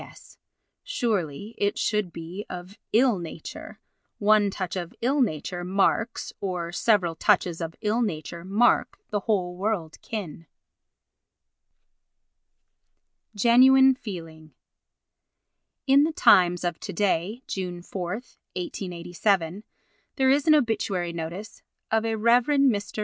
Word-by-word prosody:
S.—Surely 210 - -5
it 205 0 0
should 210 -5 0
be 170 +5 -7
"of 180 +2 -8 0.2
ill 235 -3 +3
nature." 165 -2 -9 0.4
"One 210 -1 +4
touch 190 -2 -4
of 175 -2 -5
ill 275 +4 +2
nature 175 - -2
marks—or 190 -2 -1
several 180 -2 +2
touches 180 -2 +1
of 165 0 -5
ill 220 +2 +1
nature 170 -5 -4
mark 205 +6 +2
the 205 - 0
whole 185 -4 -1
world 185 -5 -3
kin." 170 -7 -6 2.9
Genuine 260 +4 +6
Feeling 165 - -9 1.3
In 275 0 +5
the 315 +2 +1
Times 180 - +5
of 175 -2 -2
to - - -6
day, 205 +5 -1
June 180 -2 -5
4, 180 -1 -5 0.4
1887, 180 +1 -2 0.5
there 265 -1 +3
is 285 +2 +2
an 310 - +7
obituary 200 - 0
notice 170 +6 -7 0.3
of 220 0 +2
a 225 0 0
Rev. 235 +2 +4
Mr. 260 -9 +1
195 Hz, 110 wpm, -25 LUFS, 175-225 Hz, 2.9 s, an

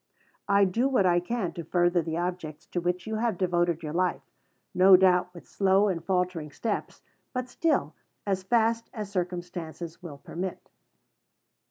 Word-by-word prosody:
] - - -40
I 200 - +6
do 230 +8 +1
what 250 -8 +3
I 175 -1 +4
can 180 -1 -3
to 170 - -6
further 175 +1 +2
the 160 0 -3
objects 170 -3 -4
to 175 - -1
which 180 0 -1
you 220 0 -3
have 225 -4 0
devoted 175 -2 0
your 150 -1 -4
life 180 +1 0 0.5
no 185 +1 +7
doubt 180 -1 +3
with 175 -1 -13
slow 195 +1 +3
and 170 -3 -2
faltering 180 -4 -1
steps, 210 +8 -4 0.3
but 250 -1 -2
still 320 +5 0 0.3
as 195 -2 0
fast 230 +3 +1
as 210 -3 -5
circumstances 175 -2 -5
will 160 -5 -8
permit. 180 +6 -6
180 Hz, 165 wpm, -27 LUFS, 175-200 Hz, 0.5 s, no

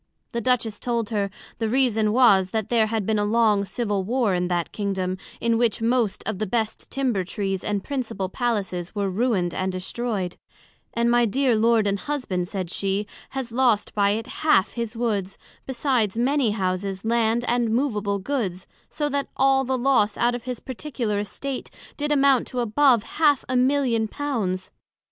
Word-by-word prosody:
The 235 - -2
Duchess 230 -3 0
told 235 -2 -2
her, 200 -2 0 0.3
The 225 -1 0
reason 225 -4 +2
was, 210 -6 +5
that 220 0 -2
there 225 -2 +3
had 220 -2 -1
been 215 0 +1
a - - +1
long 210 -1 +3
Civil 205 +1 -1
Warr 230 0 +1
in 180 0 0
that 175 -1 -1
Kingdom, 190 -3 -2 0.2
in 230 -1 +1
which 235 -4 +1
most 230 -2 +1
of 215 -3 -3
the 215 - -1
best 220 +1 -2
Timber 250 -8 0
trees 195 0 -3
and 205 -2 -1
Principal 235 -8 -3
Palaces 195 -5 -2
were 200 -2 0
ruined 190 -5 0
and 190 0 -1
destroyed; 185 0 -3 0.6
and 235 +1 +2
my 240 0 +4
dear 260 +2 +2
Lord 225 0 +3
and 200 0 0
Husband, 215 -12 -2
said 185 -3 -4
she, 195 +2 -1 0.3
has 250 -3 -3
lost 235 -4 +2
by 200 -1 +3
it 225 - -5 0.2
half 260 -11 +4
his 235 -1 -4
Woods, 205 -5 -1 0.3
besides 245 -5 0
many 265 0 +2
Houses, 190 -1 -2
Land, 230 +1 +1
and 240 -1 +1
movable 215 -5 0
Goods; 195 -5 -3 0.2
so 295 - -2
that 280 0 -1
all 270 0 +4
the 260 0 -1
loss 240 -5 +2
out 240 0 +2
of 245 -1 -5
his 250 -2 -4
particular 250 -5 -3
Estate, 260 +6 -5 0.3
did 295 0 -2
amount 275 -3 +4
to 255 - -4
above 240 0 +3
Half 295 -1 +2
a 255 - -1
Million 250 -3 +2
of - - -7
Pounds. 215 -12 -2
225 Hz, 175 wpm, -24 LUFS, 200-250 Hz, 0.6 s, was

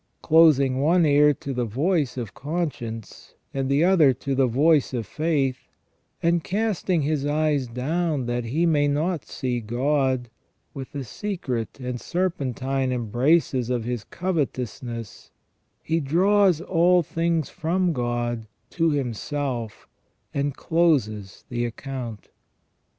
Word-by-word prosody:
Closing 150 -5 +5
one 170 +3 +4
ear 150 0 +5
to 140 -1 -5
the 125 -1 -1
voice 140 - 0
of 115 -5 -5
con 160 +3 -2
science, 115 -3 -9 0.2
and 135 -1 -1
the 140 +3 +3
other 170 -7 +5
to 135 +3 -4
the 135 -1 +3
voice 140 +2 +3
of 115 -3 -2
faith, 145 -4 -1 0.6
and 170 0 +2
casting 195 -5 0
his 150 -1 0
eyes 145 -2 +1
down 145 +4 -1
that 120 0 -2
he 150 +9 0
may 150 -3 +3
not 155 +3 -1
see 125 -2 -2
God, 130 +1 0 0.4
with 135 -3 -7
the 140 -2 -4
secret 130 - -4
and 125 -1 -4
serpentine 135 -7 -1
embraces 125 +2 +1
of 125 -2 0
his 120 -2 -3
covetousness 125 - -4 0.5
he 165 +1 0
draws 180 +4 +3
all 175 0 +3
things 165 0 -1
from 175 +2 0
God 120 -3 -2 0.2
to 165 -1 +2
himself, 130 -3 -3 0.5
and 140 0 -1
closes 120 - 0
the 120 -1 -2
account. 120 -2 -6
140 Hz, 130 wpm, -24 LUFS, 125-165 Hz, 0.6 s, Closing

